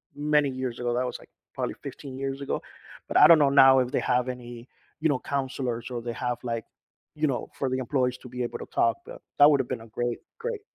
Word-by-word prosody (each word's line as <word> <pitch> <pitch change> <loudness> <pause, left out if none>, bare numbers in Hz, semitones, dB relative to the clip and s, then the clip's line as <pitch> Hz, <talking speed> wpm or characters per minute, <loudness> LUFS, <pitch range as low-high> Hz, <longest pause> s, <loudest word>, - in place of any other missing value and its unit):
many 150 0 +2
years 130 -2 -4
ago, 120 0 0
that 125 +1 0
was 125 - -4
like, - - -17 0.3
probably - - -2
15 135 -2 -9
years 135 0 -4
ago, 140 - -2 0.5
but - - -6
I - - +9
don't 165 -2 +8
know 145 - +5 0.2
now 135 0 +7
if 125 -1 +1
they - - 0
have 125 0 +1
any, 120 -1 -8 0.3
you 160 - +3
know, 135 - +1
counselors 130 -4 -3
or 120 -1 -3
they 120 0 -4
have 125 +1 -2
like, 115 -2 -3 0.6
you 155 - +4
know, 130 -3 -2
for 135 - -1
the 130 - -1
employees 125 -1 0
to 125 - -10
be 125 0 -2
able 120 - -4
to - - -6
talk, 350 -1 +2
but - - -10 0.2
that 145 +1 +9
would 140 - +3
have 125 - -8
been - - -3
a 115 - -12
great, 120 +2 -3 0.2
great 460 -2 -4
130 Hz, 245 wpm, -27 LUFS, 120-140 Hz, 0.6 s, I